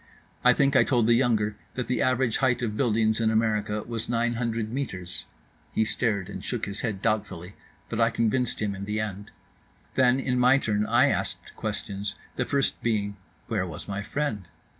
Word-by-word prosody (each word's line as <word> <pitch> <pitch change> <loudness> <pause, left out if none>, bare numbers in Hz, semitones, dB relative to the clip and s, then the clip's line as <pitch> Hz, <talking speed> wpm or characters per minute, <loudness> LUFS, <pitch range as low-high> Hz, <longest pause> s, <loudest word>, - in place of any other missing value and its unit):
I 125 - +7
think 140 +1 +2
I - - +7
told 120 -4 +2
the 120 - +5
younger 110 -4 +2 0.2
that 125 - -2
the 130 - 0
average 130 -2 +2
height 130 -2 +2
of 105 -3 -1
buildings 110 -2 +2
in 110 - +3
America 105 -1 +1
was 115 -1 -4
nine 120 0 +1
hundred 115 -2 -2
metres. 90 -11 -4 0.5
He 110 - +2
stared 105 -5 -1
and - - -7
shook - - -2
his 100 0 -6
head 105 -4 -3
doubtfully, 100 -5 -1 0.3
but 115 - -2
I 115 - +5
convinced 115 0 0
him 105 -1 0
in 100 0 -6
the 105 +1 -2
end. 105 -1 -4 0.6
Then 130 0 +4
in 125 -1 0
my 125 +2 +6
turn 105 -5 0
I - - +5
asked - - -2
questions, 100 +1 -3 0.2
the 125 - 0
first 140 0 0
being: 105 -3 0 0.3
Where 105 -5 -1
was 80 -4 -7
my 100 0 -3
friend? 105 - -3
110 Hz, 185 wpm, -27 LUFS, 105-125 Hz, 0.6 s, I